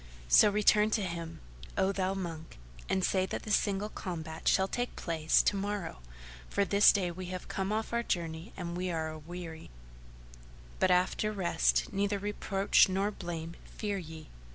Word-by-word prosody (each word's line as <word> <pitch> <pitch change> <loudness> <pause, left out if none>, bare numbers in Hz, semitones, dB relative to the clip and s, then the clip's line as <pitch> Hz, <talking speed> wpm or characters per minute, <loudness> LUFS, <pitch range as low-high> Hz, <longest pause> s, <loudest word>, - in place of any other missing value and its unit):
So 205 - +7
return 210 +1 +4
to 210 - -2
him, 170 - -5 0.4
O 190 - +3
thou 190 -1 -1
monk, 165 -4 -6 0.3
and 190 - +1
say 190 -1 +1
that - - -4
the 215 - -5
single 200 0 +1
combat 160 -5 -6
shall 190 0 +4
take 245 +4 -3
place 160 -2 +2
to - - +2
morrow, 200 - -3 0.5
for 200 - +1
this 200 +1 +6
day 185 -4 0
we 185 +1 -7
have 185 0 -6
come 190 +1 -2
off 220 +2 -2
our 235 - +2
journey 165 -6 -3
and 170 0 -4
are 170 -3 -2
aweary; 160 +1 -8 1.1
but - - +3
after 180 +4 +2
rest 195 -2 +1
neither 200 +1 0
reproach 200 -1 +2
nor 195 +2 0
blame 170 -4 -6
fear 205 -2 -3
ye." 160 -2 -10
185 Hz, 160 wpm, -31 LUFS, 170-200 Hz, 1.1 s, So